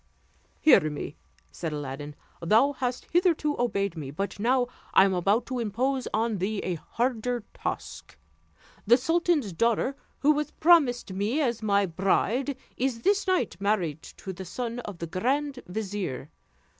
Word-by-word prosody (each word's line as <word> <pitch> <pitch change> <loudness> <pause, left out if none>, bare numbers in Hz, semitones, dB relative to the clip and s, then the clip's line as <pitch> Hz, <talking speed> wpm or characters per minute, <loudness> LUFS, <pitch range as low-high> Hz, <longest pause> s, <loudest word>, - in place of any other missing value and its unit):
"Hear 160 - +6
me," 150 0 -6 0.4
said 165 -2 -4
Aladdin; 145 0 -5 0.3
"thou 220 +11 +4
hast 250 -2 -3
hitherto 335 -4 +2
obeyed 200 -6 0
me, 150 -4 -6
but 195 +8 -4
now 245 +3 +3 0.3
I 190 - +8
am 195 - +1
about 195 +6 +2
to 255 -1 -3
impose 250 +4 -1
on 220 -2 0
thee 205 +4 -1
a 185 - -1
harder 240 - -2
task. - - -6 0.7
The 240 +3 +7
sultan's 325 - +1
daughter, 235 +8 +1 0.3
who 295 - +5
was 300 0 0
promised 285 - +3
me 205 +9 0
as 240 -6 0
my 200 -2 +3
bride, 200 - 0 0.2
is 250 -2 -1
this 400 +1 +2
night 365 - +1
married 180 -7 0
to 190 - -9
the 190 +1 -7
son 235 +6 -4
of 205 -6 -7
the 170 - -4
grand 260 - -1
vizier. 190 -8 -4
225 Hz, 150 wpm, -27 LUFS, 190-265 Hz, 0.7 s, I